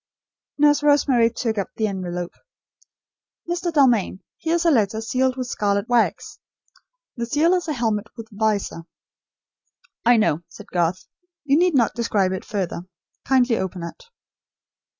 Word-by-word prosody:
Nurse 295 0 +4
Rosemary 280 -5 +4
took 225 -2 -2
up 195 - -3
the 220 - 0
envelope. 180 -3 -4 1.2
"Mr. 345 0 -2
Dalmain, 245 - +2 0.2
here 325 +1 0
is 340 0 0
a 335 - +5
letter, 220 -4 +2
sealed 255 +3 0
with 255 - -2
scarlet 205 -3 -1
wax. 240 - 0 0.8
The 235 0 -3
seal 305 +8 +3
is 360 -2 0
a 305 - -1
helmet 225 -4 -1
with 225 -1 -8
visor 205 -5 -1 0.6
" 485 - -40
"I - - +4
know," 170 -8 +2
said - - -13
Garth. 175 +1 0 0.4
"You 280 -1 +3
need 350 0 +3
not 235 -5 +3
describe 210 -5 0
it 190 - -4
further. 185 -4 -3 0.4
Kindly 250 -3 +3
open 185 -2 -4
it." 170 - -9
230 Hz, 150 wpm, -22 LUFS, 200-285 Hz, 1.2 s, a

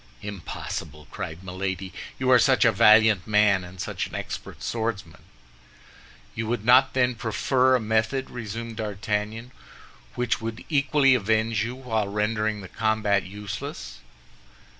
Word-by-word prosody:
"Impossible!" 85 -6 -6
cried 80 +3 -6
Milady, 95 0 -4 0.2
"you 130 -1 +1
are 125 - +7
such - - +4
a - - +6
valiant 110 -3 +5
man, 105 -3 +3
and 90 +1 -12
such - - -3
an - - -10
expert - - -6
swordsman." 110 -8 -3 1.1
"You 115 0 -4
would 115 -2 -2
not, 130 +3 +5
then, 125 -1 +3
prefer 125 +3 +2
a - - +2
method," 110 +4 -1
resumed 115 -1 -6
D'Artagnan, 105 +2 -3 0.6
"which 120 -2 -1
would 115 0 -6
equally 140 -2 +3
avenge 110 -2 +1
you 120 +2 -4
while 110 -5 -2
rendering 105 +1 -1
the 95 - -9
combat 110 -1 0
useless?" 105 - -7
110 Hz, 135 wpm, -25 LUFS, 100-120 Hz, 1.1 s, are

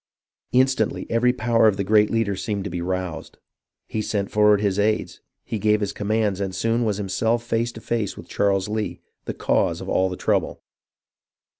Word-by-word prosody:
Instantly 130 +1 +2
every 120 +2 +3
power 115 -2 +3
of 100 -3 +2
the 100 - 0
great 105 +1 +4
leader 115 -3 0
seemed 100 +1 -3
to 100 - -5
be 90 0 -3
roused. 90 0 -4 0.5
He 110 - -2
sent 100 -2 -2
forward 105 -1 +4
his 100 -1 0
aides, 105 +1 0 0.2
he 110 - -3
gave 105 +1 +3
his 100 -1 -2
com 105 - -5
mands, 105 -3 +1
and 95 -2 -3
soon 115 +1 +1
was 105 -3 0
himself 110 +4 0
face 115 0 -1
to 115 - -10
face 115 -4 -2
with - - -10
Charles 100 -1 +1
Lee, 105 0 -3 0.3
the - - -4
cause - - +1
of - - -8
all 95 0 +2
the 90 - -5
trouble. - - -1
105 Hz, 190 wpm, -23 LUFS, 100-115 Hz, 0.5 s, great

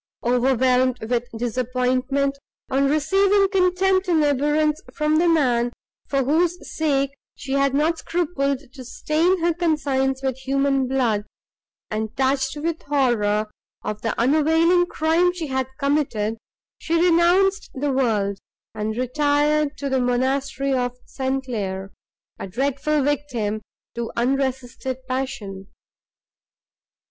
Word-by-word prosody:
Overwhelmed 250 +1 +2
with 245 0 0
disappointment, 255 +3 0 0.3
on 275 +1 +2
receiving 390 +7 +3
contempt 375 0 +2
and 325 -4 +3
abhorrence 295 +2 +1
from 305 0 +2
the 340 +1 +3
man, 245 -7 +2 0.4
for 275 -1 +1
whose 330 +6 +2
sake 275 -3 0 0.2
she 270 - -8
had 275 0 +2
not 320 +3 +1
scrupled 280 -6 -1
to 260 - -9
stain 320 +8 0
her 340 0 +2
conscience 275 -5 0
with 265 -2 -1
human 275 0 +1
blood, 235 -6 0 0.7
and, 220 +2 -3
touched 265 +1 +1
with 325 +2 -2
horror 220 -7 +1 0.3
of 210 0 -4
the 225 - -2
unavailing 320 +7 +3
crime 335 +3 +2
she 340 -3 -4
had 265 -1 -1
committed, 270 -7 0 0.4
she 330 - -1
renounced 355 +4 +3
the 280 +1 -1
world, 210 -7 0 0.3
and 215 +1 -3
retired 295 +3 +1
to 280 - -3
the 265 -1 +1
monastery 265 +2 0
of 250 -1 -1
St. 265 0 -3
Claire, 195 -5 -4 0.5
a - - -5
dreadful 280 - 0
victim 250 -7 -1 0.3
to 235 -1 -4
unresisted 260 0 -1
passion. 255 -8 -4
275 Hz, 120 wpm, -22 LUFS, 250-305 Hz, 0.7 s, receiving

